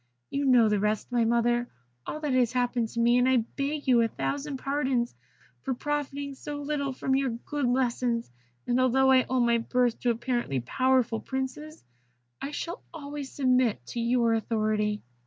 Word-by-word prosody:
You 280 0 -1
know 245 -4 +6
the 210 -1 +2
rest, 210 +3 -1
my 240 -2 +2
mother 240 +1 +1 0.4
all 305 - -4
that 295 -3 -1
has 250 -2 +2
happened 245 -2 0
to 235 - -5
me, 240 +1 +4
and 250 +1 +3
I 260 - +4 0.2
beg 290 +1 -2
you 245 -2 +5
a 230 - +3
thousand 280 +4 -3
pardons 265 -3 -1 0.5
for 265 -2 -2
profiting 285 0 -3
so 290 +2 -7
little 290 -1 -2
from 265 +1 -2
your 270 -1 +1
good 250 +4 -3
lessons; 245 - 0 0.3
and 245 +1 +1
although 265 +1 +4
I 260 -1 +4
owe 260 0 +1
my 235 -1 +3
birth 245 0 0
to 245 - 0
apparently 235 - -1
powerful 250 - +1
princes, 265 +5 -5 0.6
I 275 - -3
shall 335 +4 -5
always 290 -3 -7
submit 255 -4 +1
to 240 - -3
your 235 0 +2
authority." 215 -2 0
250 Hz, 175 wpm, -28 LUFS, 235-275 Hz, 0.6 s, know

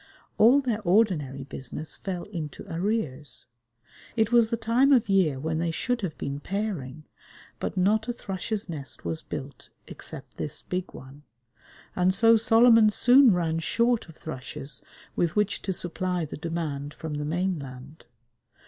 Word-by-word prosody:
All 250 +6 +7
their 235 -5 -1
ordinary 175 - +2
business 135 +3 -6
fell 180 -3 -5
into 165 -8 -7
arrears. 165 - -2 0.7
It 220 -1 +2
was 235 -2 +5
the 230 - -1
time 235 +5 +3
of 250 -6 +5
year 185 -9 +2
when 160 +2 -2
they 170 0 0
should 245 +9 -1
have 180 -6 -4
been 140 0 -4
pairing, 160 -6 -4 0.6
but - - -4
not 210 +4 +2
a 240 - -1
thrush's 205 -1 -4
nest 140 -6 -7
was 160 0 -3
built 140 -3 -8 0.2
except - - -10
this 150 +1 -4
big 180 0 -4
one, 135 +2 -12 0.7
and 185 +1 +2
so 225 +2 +6
Solomon 225 -1 +6
soon 245 +4 +6
ran 165 -3 0
short 235 +4 +1
of 165 - -13
thrushes 135 -3 -6 0.3
with 170 -2 0
which 210 -1 +1
to 195 - -2
supply 180 -1 -2
the 150 - -7
demand 150 -3 -4
from 160 -2 -6
the 150 0 -3
mainland. 150 -4 -4
180 Hz, 150 wpm, -27 LUFS, 150-220 Hz, 0.7 s, All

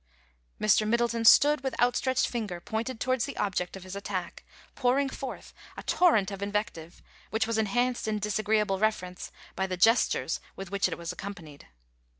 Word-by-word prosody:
Mr. 215 0 +3
Middleton 235 0 +1
stood 295 +5 +7
with 265 -3 -4
outstretched 245 +1 +2
finger 210 -7 -4
pointed 220 +6 -4
towards 255 -2 0
the 280 - -7
object 190 -2 -2
of 190 - -11
his 185 +1 -8
attack, 190 -3 -5 0.3
pouring 270 +2 +1
forth 265 -1 -7 0.2
a - - -7
torrent 220 - +3
of 195 0 -7
invective, 200 -5 -4 0.3
which 220 0 0
was 225 0 -1
enhanced 245 +3 0
in 215 -1 0
disagreeable 210 -1 0
reference 185 -4 -2 0.2
by 190 +1 -1
the 185 -1 -3
gestures 225 +6 +3 0.2
with 195 -1 -8
which 200 0 +1
it - - -4
was 170 0 -5
accompanied. 180 - -9
215 Hz, 160 wpm, -28 LUFS, 190-240 Hz, 0.3 s, stood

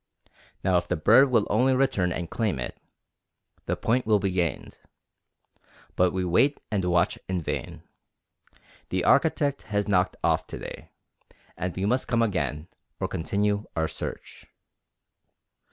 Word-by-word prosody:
Now 95 -1 +3
if 85 - -10
the 90 - 0
bird 130 - +5
will 115 -4 +3
only 130 +5 +3
return 100 -9 +1
and 85 0 -3
claim 105 - -1
it, 60 - -5 0.9
the - - 0
point 120 +1 0
will 110 -1 +5
be 100 -1 -1
gained. 85 -5 -2 1.2
But 90 -1 +3
we 95 -1 -2
wait 135 - +3
and 100 -3 0
watch 90 +1 +1
in 95 -1 0
vain. 80 - -5 1.1
The 90 -1 -1
architect 145 -2 +3
has 105 0 0
knocked 90 -2 +1
off - - +1
to - - -7
day, - - -9 0.7
and 90 -1 -4
we 95 - -1
must 125 +5 +1
come 115 -1 +2
again, 75 - -2 0.3
or - - -1
continue 105 +4 -1
our 80 -1 +1
search. - - -8
95 Hz, 145 wpm, -26 LUFS, 90-115 Hz, 1.2 s, bird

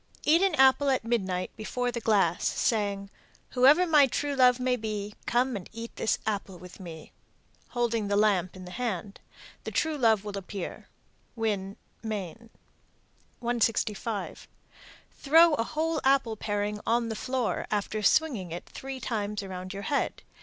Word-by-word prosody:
Eat 325 +3 +4
an 390 -4 +3
apple 265 +1 +5
at 260 -3 +1
midnight 190 -6 -1
before 245 +3 -2
the 235 - -3
glass, 195 -6 +2
saying, 200 -3 0 0.4
Whoever 280 +8 +6
my 300 -5 +6
true 290 +3 -2
love 250 -1 +5
may 250 0 +1
be, 210 -3 -4
Come 245 +1 +1
and 190 -4 -7
eat 230 +1 -8
this 220 - 0
apple 200 -3 -3
with 180 +2 -13
me, 165 -4 -10 0.6
holding 235 -3 -1
the 200 - +1
lamp 200 -4 +2
in 185 -1 -9
the 180 - -9
hand. 210 -3 -4 0.4
The - - -4
true 315 -2 -1
love 220 -5 +3
will 200 -1 -4
appear. 195 -1 -7 0.5
Winn, 205 -4 -2 0.2
Me. 210 -7 -4 1.1
165. 230 -2 -1 0.6
Throw 325 +3 +5
a 230 - +1
whole 315 +3 -1
apple 265 -4 +3
paring 205 0 -2
on 235 0 +2
the 220 - -3
floor, 255 +1 -2
after 210 +1 -1
swinging 220 - +2
it 170 - -6
three 270 0 -7
times 210 -4 -3
around 185 -1 -6
your 200 0 -6
head. 285 +4 -1
220 Hz, 155 wpm, -28 LUFS, 200-255 Hz, 1.1 s, Whoever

